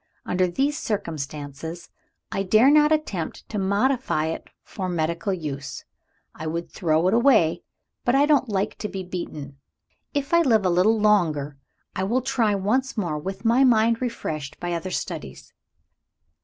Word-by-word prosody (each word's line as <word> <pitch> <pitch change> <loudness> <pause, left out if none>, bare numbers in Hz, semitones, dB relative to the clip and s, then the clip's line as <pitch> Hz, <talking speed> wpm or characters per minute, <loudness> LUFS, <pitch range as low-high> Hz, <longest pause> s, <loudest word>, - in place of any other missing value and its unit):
Under 185 0 +1
these 275 +11 0
circumstances, 155 - -5 0.4
I 195 - -1
dare 215 +8 +5
not 300 0 +5
attempt 210 - -2
to 210 - -3
modify 200 - +1
it 160 - -5 0.2
for 185 -2 -5
medical 170 +3 -1
use. 145 -7 -5 0.5
I 160 - -6
would 170 +2 -4
throw 160 0 +1
it 190 - +2
away 200 - +4 0.4
but 245 - +2
I 280 +1 +5
don't 290 -5 +3
like 200 0 -1
to 210 - -3
be 190 -1 -5
beaten. 150 -6 -7 0.6
If 285 +2 -2
I 340 - +6
live 225 - +3
a 180 - +3
little 205 +6 +3
longer 155 -10 +2 0.4
I 190 - -1
will 240 +6 +1
try 240 -6 +1
once 250 +7 0
more, 170 -7 -1
with 195 +6 -6
my 240 +4 +5
mind 230 -2 +4
refreshed 155 - -4
by 175 0 -3
other 170 +2 -3
studies." 180 - -6
190 Hz, 155 wpm, -24 LUFS, 165-235 Hz, 0.6 s, I